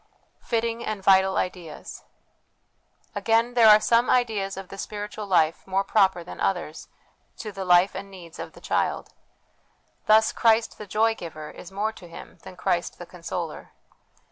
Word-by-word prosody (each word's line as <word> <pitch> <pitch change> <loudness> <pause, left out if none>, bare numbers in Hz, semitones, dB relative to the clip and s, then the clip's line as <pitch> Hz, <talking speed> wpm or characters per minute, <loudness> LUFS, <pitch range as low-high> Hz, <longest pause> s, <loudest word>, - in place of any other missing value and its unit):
Fitting 230 0 -2
and 215 -4 -4
Vital 190 0 +4
Ideas. 175 -4 -5 1.1
Again, 230 +2 +1
there 230 -3 +6
are 210 0 +9
some 230 +3 +2
ideas 215 -6 +1
of 195 -1 -8
the 195 - -9
spiritual 210 0 -6
life 165 -4 +2
more 195 +1 +1
proper 195 -4 +2
than 170 - -10
others 175 -4 -2 0.5
to 215 - -6
the 195 -1 -6
life 180 +1 +5
and 200 - -7
needs 175 -4 -12
of - - -7
the - - -15
child. - - -1 1.0
Thus, 220 +1 +5
Christ 225 0 +2
the 210 - -8
Joy 220 +3 +2
giver 155 -6 -8
is 180 - -12
more 205 +3 -1
to 185 -5 -14
him 170 - -12
than - - -11
Christ - - -1
the - - -9
Consoler. - - -6
195 Hz, 160 wpm, -25 LUFS, 185-220 Hz, 1.1 s, are